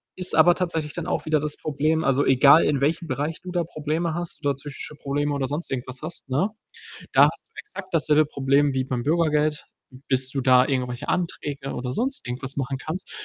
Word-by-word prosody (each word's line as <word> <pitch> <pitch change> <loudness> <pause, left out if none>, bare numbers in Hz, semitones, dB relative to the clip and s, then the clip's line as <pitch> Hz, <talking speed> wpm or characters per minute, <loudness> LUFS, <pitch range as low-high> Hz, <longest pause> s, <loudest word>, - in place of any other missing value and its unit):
ist 185 0 -5
aber 170 +2 +6
tatsächlich 165 -5 -2
dann 170 - -4
auch - - -2
wieder 155 -1 +2
das 150 0 -4
Problem 155 +2 0
also 135 +1 +2
egal 140 +4 +6
in 140 -2 +1
welchem 165 +4 0
Bereich 145 +5 -2
du 185 - -7
da 175 -1 0
Probleme 155 +1 -2
hast, 175 -1 -5
oder 140 -2 +2
psychische 145 +1 -9
Probleme 145 +1 -2
oder 135 -2 -1
sonst 150 +5 -3
irgendwas 130 0 -4
hast, 155 - -7
ne, 150 +11 +1 0.6
da - - +7
hast - - -3
du - - -48
exakt 200 - -9
dasselbe 155 -1 +3
Problem 140 0 +2
wie 130 0 0
beim 125 -2 -2
Bürgergeld. 155 -1 +1 0.4
Bis 130 0 +2
du 135 -1 -2
da 130 0 +5
irgendwelche 125 -2 -2
Anträge 145 -6 -2
oder 125 0 -4
sonst 265 - -1
irgendwas 130 +3 -5
machen 135 0 -2
kannst, 165 +7 -6
145 Hz, 200 wpm, -24 LUFS, 135-160 Hz, 0.6 s, da